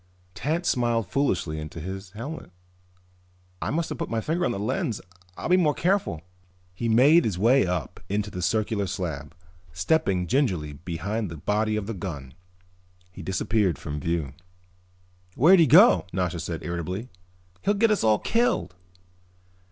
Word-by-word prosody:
Tance 165 - -2
smiled 120 -4 +1
foolishly 90 - 0
inside 75 +1 -7
his 95 +2 -6
helmet. 140 +10 -7 1.1
"I - - -2
must 165 +3 -1
have - - -5
put 165 - -3
my 115 - -1
finger 165 +9 -1
over 135 - 0
the 100 - -3
lens. 120 -1 -1 0.4
I'll - - -4
be 180 - +5
more 155 -5 +2
careful." 175 - 0 0.5
He 115 +5 -3
made 140 +9 +6
his 100 -6 -1
way 115 +3 +4
up 90 -7 -3
onto 105 +1 -1
the 90 - -5
circular 105 +2 0
slab, 80 -5 -5 0.4
stepping 90 - +1
gingerly 90 - 0
behind 90 +7 -4
the 85 - -7
body 105 +6 0
of 105 -2 -2
the 115 - -4
gun. 75 -9 -6 0.8
He - - -10
disappeared 95 - 0
from 75 0 -5
view. 80 -3 -2 1.0
"Where 160 +9 +6
did 180 - +5
he 160 - +5
go?" 90 -7 +7
Nasha 90 -2 -1
said 85 0 -5
irritably. 90 +7 -4 0.5
"He'll 205 +2 +1
get 225 +2 +3
us 210 - +1
all 110 -1 +4
killed." 235 - 0
105 Hz, 160 wpm, -25 LUFS, 85-135 Hz, 1.1 s, go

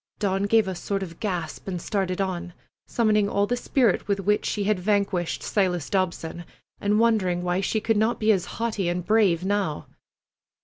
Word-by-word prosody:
Dawn 195 -1 0
gave 220 -1 +4
a 190 - -2
sort 195 +2 -3
of 170 -3 -9
gasp 180 -7 -4
and 180 -2 -3
started 185 0 -2
on, 180 -2 -3 0.3
summoning 215 -3 +2
all 200 0 +2
the 245 - 0
spirit 240 -5 +1
with 200 -1 0
which 210 +2 +1
she 205 - -1
had 205 -1 +1
vanquished 195 -3 0
Silas 180 -6 0
Dobson, 175 -3 -1 0.4
and 205 +1 +1
wondering 195 -6 +2
why 180 +1 0
she 220 +3 0
could 225 0 +1
not 220 +3 +1
be 220 0 +4
as 185 -4 +1
haughty 215 -6 -1
and 175 +1 -1
as - - -21
brave 195 -5 +3
now. 195 -6 -1
195 Hz, 185 wpm, -25 LUFS, 180-210 Hz, 0.4 s, gave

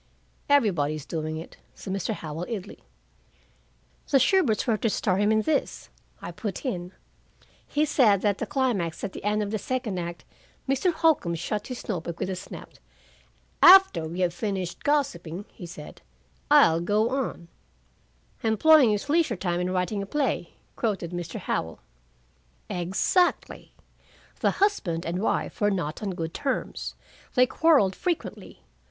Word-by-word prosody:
'" - - -38
"Everybody's 155 - +2
doing 155 -1 -4
it," 160 - -10 0.2
said 190 - -6
Mr. 195 +3 -2
Howell 160 +1 -6
idly. 205 -4 -6 1.3
"The 275 - +5
Shuberts 270 - +3
were 230 - +2
to 225 - 0
star 190 -2 0
him 205 +2 +2
in 220 0 +2
this," 305 +2 -2 0.3
I - - -5
put 210 +3 -5
in. 180 -7 -3 0.7
"He 300 +1 +1
said 220 -10 +3
that 205 -2 +1
the - - -3
climax 205 - -1
at 200 - -4
the - - -8
end 210 +1 +1
of 205 - -4
the 215 - -1
second 235 -4 -3
act 170 0 -6 0.2
" - - -35
Mr. 275 +7 +2
Holcombe 315 - +2
shut 205 +5 -3
his 250 -2 -7
note 180 -7 -3
book 170 -1 -6
with 190 - -2
a - - -2
snap. 180 - -9 0.9
"After 365 - +7
we 175 +3 -4
have 175 -1 +1
finished 190 -3 -4
gossiping," 200 - -1
he 180 - -10
said, 155 -3 -11 0.5
"I'll 165 +1 +6
go 210 +6 +1
on." 255 -10 -3 0.9
"'Employing 255 +5 +5
his 210 +5 -1
leisure 300 - +2
time 175 -1 -1
in 180 0 -1
writing 185 +3 -1
a 200 - -6
play 290 +5 -1
'" - - -38
quoted 195 -7 -2
Mr. 175 -2 -5
Howell. 80 0 -3 0.9
"Exactly. 195 - 0 0.6
'The - - +2
husband 195 - 0
and 175 +3 -2
wife 225 - -1
were 205 - +4
not 170 -6 -3
on 210 - -2
good 165 -1 -4
terms. 270 -2 -3 0.4
They 250 - +6
quarreled 275 - +3
frequently. 350 -3 -4
205 Hz, 160 wpm, -26 LUFS, 175-255 Hz, 1.3 s, After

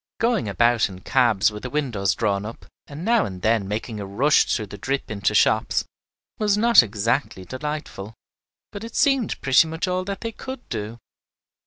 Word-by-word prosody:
Going 230 - +1
about 120 +1 +2
in 95 -1 -11
cabs 110 -5 +2
with 105 0 -8
the 125 - -5
windows 120 -9 -1
drawn 100 -3 0
up, 115 +2 -9 0.2
and 150 +5 -8
now 230 -2 +3
and 90 -2 -7
then 110 -3 +2
making 105 +1 -4
a 100 - -5
rush 135 +10 +3
through 110 - -1
the 100 0 -10
drip 135 +3 -3
into 105 0 -1
shops, 110 +1 +2 0.5
was 210 -1 +2
not 230 - +7
exactly 105 -2 -2
delightful, 130 - -6 0.6
but 205 - -8
it 230 0 -9
seemed 270 -6 +2
pretty 135 +4 +4
much 160 +4 -3
all 185 0 -1
that 200 -1 -5
they 230 - -3
could 260 +3 -9
do. 110 +1 -5
120 Hz, 180 wpm, -23 LUFS, -, 0.6 s, not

